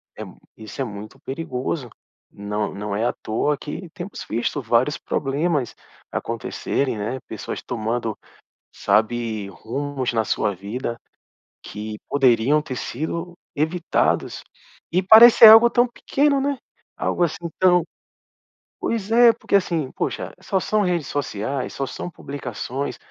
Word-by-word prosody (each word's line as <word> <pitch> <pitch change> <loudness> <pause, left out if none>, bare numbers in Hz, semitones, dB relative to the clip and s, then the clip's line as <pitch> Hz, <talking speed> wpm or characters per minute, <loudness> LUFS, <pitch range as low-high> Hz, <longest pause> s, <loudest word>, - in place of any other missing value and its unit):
é - - -7
mui - - -12 0.2
isso 110 +2 -11
é - - +1
muito 105 +5 -9
perigoso. 135 -2 -4 0.4
Não 105 +1 -3
não 100 0 -4
é 110 - -1
à - - -1
toa 140 +7 0
que 170 +4 -7
temos 190 +1 -7
visto 120 +5 -1
vários 120 +5 +2
problemas 145 -1 -1 0.4
acontecerem, 135 -4 -2
né, 110 +5 -3
pessoas - - -6
tomando, 115 -1 -2 0.6
sabe, 110 -2 0
rumos 130 +4 -4
na 110 -1 +1
sua 105 -2 0
vida 115 +5 -5 0.7
que 105 0 -7
poderiam 135 +2 +3
ter 130 - -6
sido 170 +8 -4 0.2
evitados 160 +4 0 0.5
e 180 +3 +2
parecer 220 +3 +10
algo 225 +2 +9
tão 240 +1 +3
pequeno, 280 +3 +1
né, 280 0 0 0.4
algo 175 - -1
assim 170 +1 -1
tão 180 -2 +4 1.0
pois 220 -2 -2
é 235 0 +7
porque, 200 - 0
assim, 165 -7 0
poxa - - -3
só 190 0 -1
são 215 +2 +1
redes 175 -6 -1
sociais, 135 -1 -3
só 135 - -3
são 175 - -6
publicações, 140 -3 -5
140 Hz, 130 wpm, -22 LUFS, 115-175 Hz, 1.0 s, parecer